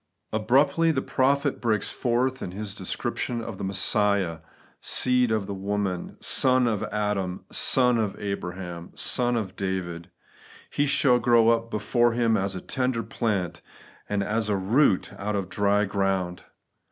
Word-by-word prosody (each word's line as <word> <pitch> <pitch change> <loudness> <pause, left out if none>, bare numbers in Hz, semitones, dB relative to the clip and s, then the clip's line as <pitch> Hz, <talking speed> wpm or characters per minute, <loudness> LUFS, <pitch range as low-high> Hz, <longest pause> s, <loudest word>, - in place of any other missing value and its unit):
Abruptly 140 +9 +3
the 135 -5 0
prophet 140 +2 +1
breaks 110 -4 0
forth 130 +2 0
in - - -4
his 105 0 -5
descrip 95 -3 -3
tion 120 -1 -2
of 110 -4 -6
Messiah, 95 -3 +1 0.4
seed 125 -2 +2
of 110 -3 0
the 100 - -5
woman, 100 -2 -3
son 130 -1 +3
of 110 -4 0
Adam, 100 -3 -2
son 125 -2 +3
of 105 -3 -2
Abraham, 90 -3 -5
son 120 -1 +1
of 100 -5 -3
David: 90 -3 -4 0.3
* - - -22
He 145 - +1
shall 125 -3 +3
grow 120 -1 +4
up 115 0 +1
before 115 +3 +1
Him 115 -1 +2
as 95 -1 -1
a 90 - -5
tender 125 -3 -1
plant, 95 -7 -2 0.5
and 100 -1 0
as 110 +1 -1
a 105 - +2
root 100 +2 +2
out 105 +1 -2
of 100 - 0
a - - -19
dry 100 +1 +2
ground.' 95 -3 -1
105 Hz, 155 wpm, -26 LUFS, 95-120 Hz, 0.5 s, grow